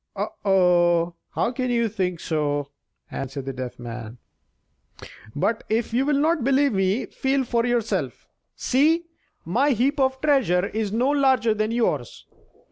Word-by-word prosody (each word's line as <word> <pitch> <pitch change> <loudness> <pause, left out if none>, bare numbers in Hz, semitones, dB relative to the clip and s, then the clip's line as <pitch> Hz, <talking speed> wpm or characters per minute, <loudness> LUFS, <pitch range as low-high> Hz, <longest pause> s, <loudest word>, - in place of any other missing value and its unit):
"Oh, - - -2
oh! 175 -3 +3 0.2
how 235 - +1
can 255 0 -2
you 235 -1 +1
think 185 -5 -2
so?" 145 -3 -2 0.4
answered 135 0 -5
the 135 - -4
Deaf 130 -1 -6
Man; 120 -1 -8 1.2
"but 220 +9 0
if 225 +1 -1
you 260 +4 +1
will 295 -1 +2
not 310 -1 +1
believe 275 0 +3
me, 195 +5 +1
feel 270 0 -1
for 235 -1 0
yourself. 235 -2 -2 0.3
See, 315 +6 +2 0.4
my 255 - +2
heap 270 +5 0
of 265 0 +1
treasure 255 - +2
is 215 0 -3
no 245 +6 +1
larger 265 -5 +3
than 215 0 -1
yours." 220 - -2
225 Hz, 145 wpm, -24 LUFS, 175-265 Hz, 1.2 s, oh